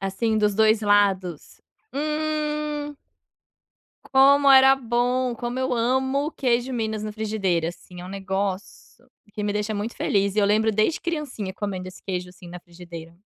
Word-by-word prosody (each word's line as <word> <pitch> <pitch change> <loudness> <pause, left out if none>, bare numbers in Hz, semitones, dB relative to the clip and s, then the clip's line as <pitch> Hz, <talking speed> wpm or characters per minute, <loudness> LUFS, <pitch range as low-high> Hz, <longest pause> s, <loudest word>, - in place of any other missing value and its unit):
assim, 205 +3 -1
dos 210 -1 +2
2 220 +1 +4
lados. 195 -5 +1 0.3
Hum. 300 0 -2 1.2
Como 275 +1 +6
era 265 0 +8
bom! 245 0 0
Como 240 +2 -4
eu 260 -1 0
amo 265 +4 0
o - - -7
queijo 245 -1 0
minas 220 -3 -2
na 215 0 -4
frigideira, 195 -6 -1
assim, 180 +1 -11
é 180 - -8
um - - -8
negócio 195 +5 -5 0.3
que 210 - -4
me 205 - 0
deixa 210 +1 -2
muito 210 +3 -4
feliz 200 -1 0
e - - +1
eu 200 - +3
lembro 220 +2 +2
desde 215 +10 +1
criancinha 290 - -4
comendo 190 -3 -4
esse 185 - -13
queijo 180 -2 -4
assim 180 -1 -14
na 180 - -8
frigideira. 170 -1 -11
215 Hz, 165 wpm, -24 LUFS, 195-260 Hz, 1.2 s, era